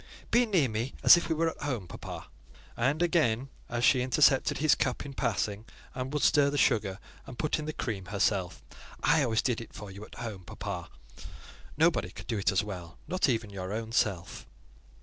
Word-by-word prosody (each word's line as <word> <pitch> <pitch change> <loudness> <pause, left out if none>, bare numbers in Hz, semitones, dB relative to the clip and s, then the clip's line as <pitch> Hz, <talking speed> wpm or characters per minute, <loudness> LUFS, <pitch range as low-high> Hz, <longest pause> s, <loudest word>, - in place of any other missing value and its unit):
"Be 240 +1 +4
near 180 -10 +3
me, 115 +3 -3
as - - +10
if 170 - -2
we 160 - +1
were 165 +1 +1
at - - -15
home, 125 -11 -3
papa." - - -8 0.5
And 140 +8 +1
again, 135 -7 +1 0.2
as 120 0 0
she 130 0 +5
intercepted 130 +1 +3
his 155 0 +4
cup 130 +1 -1
in 140 - -7
passing, 105 -5 -1 0.3
and 130 +1 -4
would 150 -1 -1
stir 145 -2 +5
the 145 - -2
sugar, 105 -8 +2 0.3
and 130 -3 -9
put 155 0 0
in 150 - -4
the 155 - -2
cream 105 -9 -4
herself, 95 -1 -1 0.4
"I 160 +1 +4
always 115 -5 +1
did 120 -3 0
it 115 - -11
for 105 -2 -8
you 100 +2 -9
at - - -12
home; 110 -6 -6
papa: - - -6 0.9
nobody - - +3
could - - -10
do 115 -4 -2
it 100 - +2
as 95 - +1
well, 90 -5 -8
not 185 -5 +1
even 115 -4 -1
your 95 -1 -5
own 110 +1 -4
self." 100 -6 -1
120 Hz, 200 wpm, -29 LUFS, 105-145 Hz, 0.9 s, as